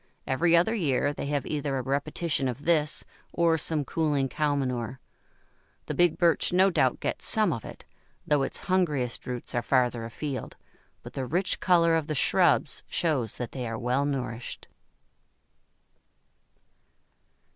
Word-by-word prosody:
Every 165 +6 +3
other 180 +7 +3
year 145 - +1
they 140 - -5
have 145 -1 -1
either 145 -2 -2
a 130 - -2
repetition 145 +2 -1
of 130 +3 -5
this 155 -3 +2 0.3
or 170 -1 +2
some 155 -2 0
cooling 145 -4 0
cow 150 +1 0
manure. 125 -2 -3 0.9
The - - -4
big 175 -2 +3
Birch 170 -3 +3
no 190 +2 +4
doubt - - +2
gets - - -1
some 215 -7 +3
of 115 - -6
it, - - -11 0.4
though 145 -2 +2
its 135 - -1
hungriest 150 -10 0
roots 125 -1 -5
are 120 - +1
farther 125 -2 +1
afield, 130 +4 -5 0.5
but - - -10
the 130 -2 -3
rich 180 +7 0
colour 170 -2 +4
of 160 -2 -1
the 155 - -2
shrubs - - +3
shows 140 -10 -1
that 120 - -5
they 125 -3 -4
are 115 0 -4
well 125 +4 0
nourished. 125 -4 -4
145 Hz, 150 wpm, -27 LUFS, 125-165 Hz, 0.9 s, no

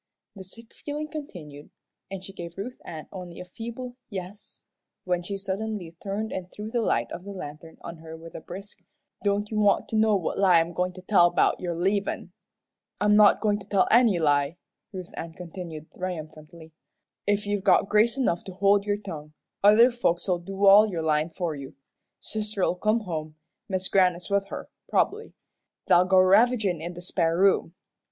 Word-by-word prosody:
The 195 - -9
sick 225 +5 -13
feeling 300 +1 -5
continued, 160 - -9 0.4
and 190 -1 -6
she 195 - -9
gave 170 -2 -8
Ruth 245 +6 -6
Ann 155 -2 -8
only 180 -3 -8
a 180 - -7
feeble 235 +6 -7
"yes," 195 0 -9 0.4
when 180 -1 0
she 195 +3 -5
suddenly 195 -2 -4
turned 210 +3 -3
and 180 -1 -5
threw 210 +1 -7
the 240 - 0
light 120 - 0
of 175 - -6
the 200 - -9
lantern 160 -3 -9
on 170 0 -8
her 160 0 -10
with 165 +1 -12
a - - -7
brisk, 195 +5 -10 0.4
"Don't 205 +1 0
you 215 - 0
want 205 -1 +3
to - - -3
know 215 -1 +4
what 185 -1 -2
lie 185 -4 +6
I'm 165 +1 -1
goin' 180 +2 -1
to 185 0 -12
tell 185 -3 +5
'bout - - +2
your 175 -2 -3
leavin'? 195 +4 -1 0.7
"I'm 210 0 +4
not 210 -1 +6
goin' 210 -1 +1
to - - -13
tell 195 -2 +3
any 230 -5 +5
lie," 145 0 +1 0.3
Ruth 185 -2 -8
Ann 165 -1 -6
continued, 170 -3 -8
triumphantly. 160 -2 -7 0.6
"If 205 0 +1
you've 205 -1 -1
got 195 0 +4
grace 220 +5 +3
enough 180 -10 0
to 190 - -8
hold 200 +2 +3
your 205 0 +1
tongue, 155 -7 -8 0.3
other 220 +5 +7
folks'll 180 -6 0
do 195 +3 -2
all 205 +2 +8
your 170 -4 -3
lyin' 155 +1 +1
for 170 0 -3
you. 140 -2 -9 0.4
Sister'll 210 -4 -1
come 215 +5 +1
home, 155 -5 -5 0.3
Mis' 190 -1 -1
Grannis 180 -1 +2
with 200 0 +1
her, - - -7 0.2
prob'bly. 445 +2 0 0.5
They'll 180 +1 +5
go 190 0 +3
ravagin' 200 -2 +4
in 170 +2 -6
the 175 - -9
spare 170 -2 0
room. 190 -2 +3
190 Hz, 185 wpm, -26 LUFS, 170-210 Hz, 0.7 s, all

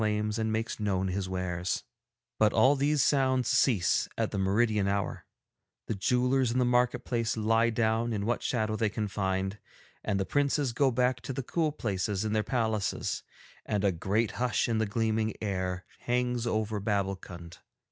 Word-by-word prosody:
'But 110 -1 +4
all 135 +3 +5
these 145 0 +2
sounds 130 -3 +2
cease 125 -6 +2
at - - 0
the 100 - -2
meridian 105 +1 +2
hour, 100 0 -2 0.6
the - - -2
jewellers 125 +5 +2
in 120 - -1
the 125 - +3
market 125 0 +2
place 115 -2 -1
lie 115 +2 +3
down 115 +1 +1
in 100 -2 -2
what 120 +2 0
shadow 110 -3 -1
they 110 -1 +1
can 105 +1 -3
find, 95 0 -2 0.4
and 100 -2 0
the 95 - 0
princes 140 -1 +1
go 140 +2 +3
back 125 0 +1
to 135 - -5
the 135 - -3
cool 160 +4 0
places 105 -6 -2
in 110 - -1
their 110 - +2
palaces, 110 -3 -1 0.4
and 105 -1 -1
a 100 - +4
great 100 +6 0
hush 125 0 +1
in 115 -2 0
the 110 - +1
gleaming 110 0 0
air 95 -3 -2
hangs 125 -1 -1
over 110 -1 -1
Babbulkund. 95 -4 -3
110 Hz, 155 wpm, -29 LUFS, 100-125 Hz, 0.6 s, all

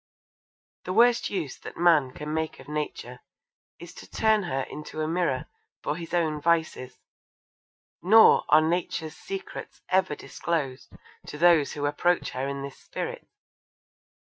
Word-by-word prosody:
The 185 - -3
worst 235 +2 +4
use 170 -9 -4
that - - -10
man 165 -6 +4
can 150 +4 -6
make 160 0 -3
of - - -13
Nature 150 0 -5 0.6
is - - -11
to - - -13
turn 220 -1 +2
her 135 -8 -2
into 150 +3 -7
a - - -1
mirror 165 -6 0 0.4
for - - -1
his 170 0 -8
own 160 -4 0
vices, 160 -5 0 1.0
nor 220 +5 +7
are 155 - +7
Nature's 170 -2 -2
secrets 390 0 -7
ever 185 -4 +2
disclosed 145 -7 -4 0.4
to 150 - -7
those 165 -3 +4
who 145 -1 -3
approach 175 +4 +1
her 130 +2 -3
in 140 0 -4
this 140 -1 -8
spirit. - - -6
160 Hz, 145 wpm, -26 LUFS, 145-175 Hz, 1.0 s, nor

